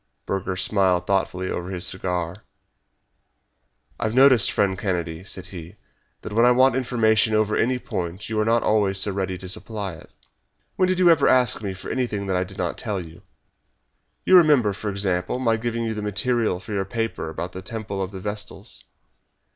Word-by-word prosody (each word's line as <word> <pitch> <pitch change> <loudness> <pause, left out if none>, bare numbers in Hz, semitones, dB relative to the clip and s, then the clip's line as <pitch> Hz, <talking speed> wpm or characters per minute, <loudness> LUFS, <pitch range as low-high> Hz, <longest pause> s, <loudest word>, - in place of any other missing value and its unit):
Burger 95 -1 -2
smiled 95 -2 +1
thoughtfully 95 -1 -1
over 90 +1 -4
his 90 -1 -3
cigar. 90 -1 -2 1.6
"I - - -1
have 110 +1 -1
noticed, 130 -6 +6
friend 100 -2 +1
Kennedy," 90 -4 -3
said 95 -2 -6
he, 90 -3 -9 0.5
"that - - -6
when 115 +2 +4
I 120 - +7
want 130 +1 +4
information 110 -4 +2
over 110 0 +2
any 125 +2 +1
point 90 -5 -5
you 110 -1 -2
are - - +3
not 115 +1 +2
always 100 -3 +2
so 100 - +1
ready 95 -1 -2
to 95 - -9
supply 100 0 -4
it." 80 - -13 0.7
"When 185 - +2
did 185 0 +1
you 180 -2 +6
ever 160 -4 +4
ask 125 -3 +3
me 100 -3 -4 0.2
anything 115 -6 -2
that 95 -1 -1
I 90 - +1
did 95 +1 -10
not 90 -1 -2
tell 105 -4 -2
you? 85 0 -10 1.0
You 185 - +7
remember, 145 - +5
for 105 +1 -4
example, 95 0 -1
my 115 -3 +2
giving 115 +1 -2
you 115 -1 -2
the 105 - -4
material 105 0 0
for 95 +3 -8
your 100 -1 0
paper 115 -5 -3
about 85 +3 -5
the 95 - -7
temple 105 -1 -5
of 95 - -2
the 95 -1 -8
Vestals." 105 +2 -6
100 Hz, 185 wpm, -23 LUFS, 95-115 Hz, 1.6 s, I